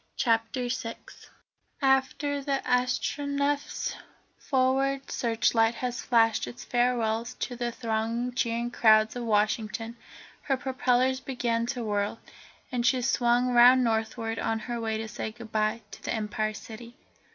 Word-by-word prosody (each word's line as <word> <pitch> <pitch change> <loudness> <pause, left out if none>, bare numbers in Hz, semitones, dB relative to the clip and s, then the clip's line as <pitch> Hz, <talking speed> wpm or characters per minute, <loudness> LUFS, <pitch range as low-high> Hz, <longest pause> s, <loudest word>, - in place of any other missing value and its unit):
CHAPTER 230 +1 +1
VI 235 -2 -3 0.8
After 270 +1 +1
the 275 -1 -1
Astronef's 280 +3 0 0.4
forward 270 0 +1
searchlight 225 -1 +2
had 250 0 -3
flashed 225 - +2
its 120 0 -9
farewells 240 -1 0
to 245 - -4
the 240 0 -2
thronging, 230 +1 -2
cheering 235 -1 -1
crowds 220 -1 +4
of 245 -1 -4
Washington, 220 +1 0 0.5
her 270 -2 0
propellers 255 0 +1
began 235 -3 -1
to 245 -1 -3
whirl, 205 0 -1 0.5
and 245 -2 -1
she 245 +1 +2
swung 245 0 +2
round 250 +2 +7
northward 225 0 -1
on 225 - 0
her 235 +1 -4
way 220 -1 -1
to 220 0 -4
say 220 - -5
goodbye 220 -1 -2
to - - -11
the - - -2
Empire 215 0 -2
City. 230 +2 -10
240 Hz, 130 wpm, -28 LUFS, 225-255 Hz, 0.8 s, round